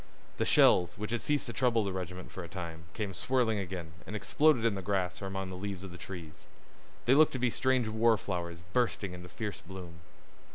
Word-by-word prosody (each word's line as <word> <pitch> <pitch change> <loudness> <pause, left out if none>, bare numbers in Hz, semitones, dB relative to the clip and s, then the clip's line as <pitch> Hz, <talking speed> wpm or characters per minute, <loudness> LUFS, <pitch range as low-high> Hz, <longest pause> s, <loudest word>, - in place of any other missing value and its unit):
The - - +1
shells, 90 -1 +5
which 105 +2 -4
had 120 - 0
ceased 145 -1 +1
to 120 - -4
trouble 115 0 +3
the 100 -2 -2
regiment 90 0 -5
for 95 - -6
a - - -7
time, 85 -3 -6
came 105 -3 -2
swirling 120 0 +1
again, 90 -4 -5 0.2
and 105 - -5
exploded 125 +3 +3
in 115 - +3
the 95 - -3
grass 95 -1 -1
or 100 - -3
among 95 -1 -4
the - - -5
leaves 100 0 -5
of 95 - -7
the 85 - -9
trees. 85 -5 -9 0.6
They 125 - +5
looked 155 +2 +6
to - - -1
be 125 -1 +1
strange 130 -2 +2
war 110 +1 +4
flowers 85 -3 -4
bursting 110 -6 +1
into 90 0 -9
fierce 105 -1 -5
bloom. 90 -2 -9
95 Hz, 215 wpm, -31 LUFS, 90-115 Hz, 0.6 s, looked